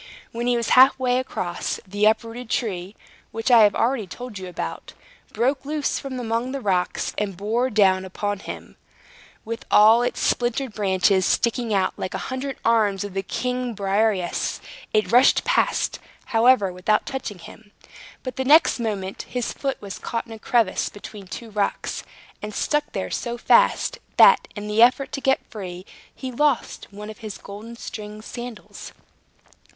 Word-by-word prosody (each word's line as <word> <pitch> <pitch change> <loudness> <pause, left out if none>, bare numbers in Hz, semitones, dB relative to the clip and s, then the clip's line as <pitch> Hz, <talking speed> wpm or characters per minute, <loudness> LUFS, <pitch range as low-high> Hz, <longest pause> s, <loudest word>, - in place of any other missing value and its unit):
When 235 +1 -3
he 245 -1 +3
was 235 - -2
half 260 +2 +7
way 250 -1 +1
across, 175 -9 -3
the 205 +2 0
uprooted 230 +2 -1
tree 195 -5 -2 0.4
(which 225 +3 -1
I 235 -2 +8
have 205 -2 +5
already 235 -4 0
told 245 0 -8
you 185 - -7
about) 180 - -6 0.4
broke 265 +3 0
loose 295 0 -1
from 265 -2 -6
among 235 +2 -2
the 275 - -3
rocks, 185 -6 -1
and 200 -4 -3
bore 230 +6 0
down 190 -4 +3
upon 205 +2 -3
him, - - -9 0.7
with 230 +1 -5
all 220 +3 +7
its 245 - -1
splintered 245 0 0
branches 190 -2 +2
sticking 235 -1 +1
out 195 -2 +1
like 185 - -4
the - - -2
hundred 265 +1 -4
arms 210 -4 +2
of 205 -2 -7
the 195 - -1
giant 250 +4 -3
Briareus. 200 -2 0 0.3
It 215 0 +1
rushed 250 +3 +5
past, - - +1 0.3
however, 230 -5 +3
without 195 +4 +1
touching 250 -7 -5
him. 205 +4 -14 0.5
But 255 -2 -6
the 265 - 0
next 300 0 +5
moment 200 -4 -4
his 245 -2 -2
foot 270 -1 -3
was 200 -2 -7
caught 230 - -3
in 230 - -10
a 220 - -10
crevice 225 -4 +1
between 205 -1 -11
two 225 +4 -8
rocks, 205 -1 -2 0.4
and 210 -1 -6
stuck 295 0 0
there 190 - -3
so 240 -1 -3
fast, - - +3 0.2
that, - - +7
in 210 -1 -6
the 210 +2 +2
effort 260 +3 +4
to 275 - -4
get 265 -1 +1
free, 185 -3 -7 0.3
he 260 -1 -6
lost 285 +1 0
one 210 +1 -8
of 215 - -14
his 215 -3 -7
golden 215 +4 -10
stringed 210 -2 -8
sandals. 240 -2 -8
225 Hz, 165 wpm, -23 LUFS, 200-250 Hz, 0.7 s, I